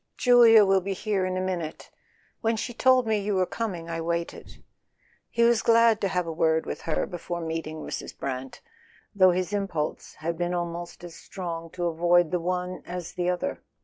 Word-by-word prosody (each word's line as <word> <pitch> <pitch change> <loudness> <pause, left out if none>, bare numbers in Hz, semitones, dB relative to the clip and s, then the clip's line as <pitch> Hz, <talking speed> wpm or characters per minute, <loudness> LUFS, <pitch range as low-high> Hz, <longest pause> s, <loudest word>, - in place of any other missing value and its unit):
"Julia 235 -4 +7
will 195 0 +3
be 195 +2 -3
here 195 -1 -1
in 185 0 -2
a - - -1
minute. 175 -4 -4 0.5
When 225 -1 0
she 235 +2 -4
told 255 +1 +4
me 220 -1 +1
you 205 0 -1
were 185 -1 +2
coming 180 -6 -4
I 165 0 -3
waited." 170 +1 -4 0.7
He 235 - +1
was 235 -1 +4
glad 230 -1 +4
to 195 - +2
have 180 -1 -1
a 165 - -4
word 160 0 +1
with - - -5
her 155 - +1
before 175 0 -5
meeting 160 -1 -4
Mrs. - - -6
Brant, 130 -1 -5 0.5
though 185 -2 +6
his 180 +2 -1
impulse 195 -7 -3
had 165 +2 -4
been 175 0 -1
almost 175 0 -5
as 175 -1 -8
strong 165 -2 -6
to 175 -1 -3
avoid 175 0 +3
the 180 - +1
one 180 +1 -3
as 175 -1 -6
the 180 0 -1
other. 180 +11 -2
180 Hz, 190 wpm, -26 LUFS, 170-205 Hz, 0.7 s, Julia